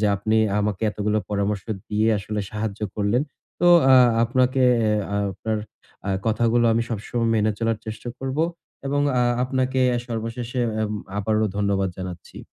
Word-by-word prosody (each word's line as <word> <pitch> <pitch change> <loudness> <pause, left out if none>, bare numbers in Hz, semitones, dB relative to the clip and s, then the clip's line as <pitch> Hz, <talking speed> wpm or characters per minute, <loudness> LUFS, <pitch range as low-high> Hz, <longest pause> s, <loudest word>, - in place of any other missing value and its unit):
যে, 105 - +3
আপনি 110 +3 0 0.2
আমাকে 105 0 -2
এতগুলো 105 +1 -1
পরামর্শ 100 -1 -1 0.2
দিয়ে 110 +1 +1
আসলে 105 +1 -4
সাহায্য 110 -1 -4
করলেন। 105 +5 +1 0.4
তো 175 - +3 0.3
আ - - +9 0.3
আপনাকে 130 +2 +2 0.2
এ - - +2 0.4
আপনার 110 +3 -3 0.5
আ - - +1 0.2
কথাগুলো 115 +2 +2
আমি 115 +1 +2
সবসময় 115 +2 -2
মেনে 110 0 +2
চলার 115 -1 0
চেষ্টা 110 +2 -6
করব। 135 +2 -4 0.5
এবং 145 +1 0 0.2
আ - - +3 0.2
আপনাকে 130 0 0 0.3
সর্বশেষে 115 +2 -4 0.2
এ - - +1 0.4
আবারও 110 +1 +1
ধন্যবাদ 100 -2 +1
জানাচ্ছি। 90 -2 -8
110 Hz, 145 wpm, -23 LUFS, 105-120 Hz, 0.5 s, আ